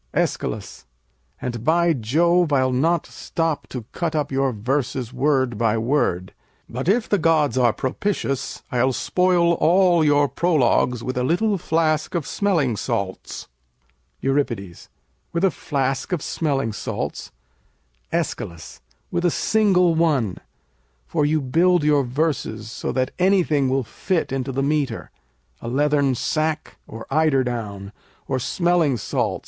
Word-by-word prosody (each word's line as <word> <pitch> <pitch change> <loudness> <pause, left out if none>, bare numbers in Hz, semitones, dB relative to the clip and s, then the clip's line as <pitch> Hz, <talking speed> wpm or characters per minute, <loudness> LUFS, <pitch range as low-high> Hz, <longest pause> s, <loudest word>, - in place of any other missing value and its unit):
] - - -43
Æschylus - - -2 0.5
And 120 -3 -4
by 170 +3 +3
Jove, 165 +7 +2
I'll 130 -2 +2
not 160 +6 +1
stop 165 -3 -3
to 125 -4 -7
cut 170 -2 -2
up 150 -2 -1
your 135 0 +1
verses 125 +2 -2
word 130 -3 +1
by 115 -1 +2
word, 110 -7 0 0.3
but 130 +8 -3
if 220 +3 +2
the 205 - +1
gods 155 -5 +2
are 125 -2 +4
propitious 135 - -3
I'll 130 +1 +2
spoil 180 +2 +2
all 175 0 +4
your 145 -1 +4
prologues 125 -7 +1
with 130 0 -3
a - - 0
little 195 - +1
flask 155 0 0
of 165 -5 -1
smelling 160 - 0
salts. 95 -1 -4 0.7
Euripides 120 -10 -2 0.4
With 170 +2 -1
a 195 - +4
flask 135 -2 -2
of 175 -5 -1
smelling 135 -8 -1
salts? - - -5 0.8
Æsch. 85 -1 -4 0.3
With 175 -1 -1
a 175 - +4
single 185 -3 +3
one. 150 - +1 0.7
For 145 - 0
you 155 +1 +2
build 170 +5 +3
your 150 -2 +3
verses 125 -5 -2
so 115 - -4
that 130 -1 -1
anything 175 -8 +3
will 135 0 +1
fit 165 - -2
into 135 0 -2
the 135 +1 -1
metre, 145 -1 -1 0.5
a - - -6
leathern 140 +1 +2
sack, 155 +4 -2
or 115 0 -9
eider 150 -3 +3
down, 105 -5 -5 0.4
or 130 - -1
smelling 170 -1 +1
salts. - - -1
145 Hz, 140 wpm, -22 LUFS, 125-165 Hz, 0.8 s, are